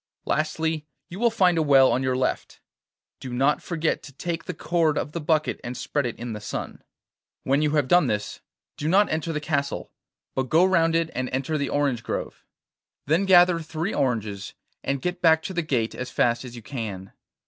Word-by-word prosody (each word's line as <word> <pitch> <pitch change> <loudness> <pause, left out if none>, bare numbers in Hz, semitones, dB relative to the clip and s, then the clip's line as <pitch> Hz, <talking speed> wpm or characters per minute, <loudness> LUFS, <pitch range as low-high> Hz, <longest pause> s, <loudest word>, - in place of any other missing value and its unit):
Lastly, 155 0 -1 0.2
you 180 - -8
will 235 0 +4
find 185 -7 +3
a - - +3
well 135 -3 +6
on 130 - +1
your 130 -1 0
left; 130 - -2 0.6
do 130 - -7
not 135 +4 +2
forget 165 -2 -1
to 145 - -11
take 165 +4 -4
the - - -4
cord 160 -2 +1
of - - -2
the 170 - -4
bucket 155 0 0
and 120 +1 -5
spread 130 +1 -1
it 120 - -5
in 120 -1 -6
the 105 - -6
sun. - - -5 0.6
When 135 +2 +2
you 150 -1 +1
have 145 -3 +2
done 175 0 +5
this, 105 -2 -3 0.4
do 150 - -3
not 200 +4 +4
enter 160 +1 -1
the 150 - -2
castle, 145 -2 -2 0.4
but 130 -1 -2
go 170 +3 +5
round 165 -3 +3
it 165 -1 +1
and 130 0 -2
enter 135 +4 -2
the 140 -2 -1
orange 140 -5 0
grove. 105 - -5 0.6
Then 165 +7 +2
gather 180 -2 +6
three 165 +4 -3
oranges, 110 -7 -2 0.3
and 140 -1 -2
get 180 0 -2
back 160 -1 +5
to 190 - -5
the 175 - 0
gate 125 -8 -1
as 125 - -5
fast 120 0 +1
as 120 -1 -9
you 120 - -10
can. 105 -7 -6
150 Hz, 205 wpm, -25 LUFS, 130-165 Hz, 0.6 s, well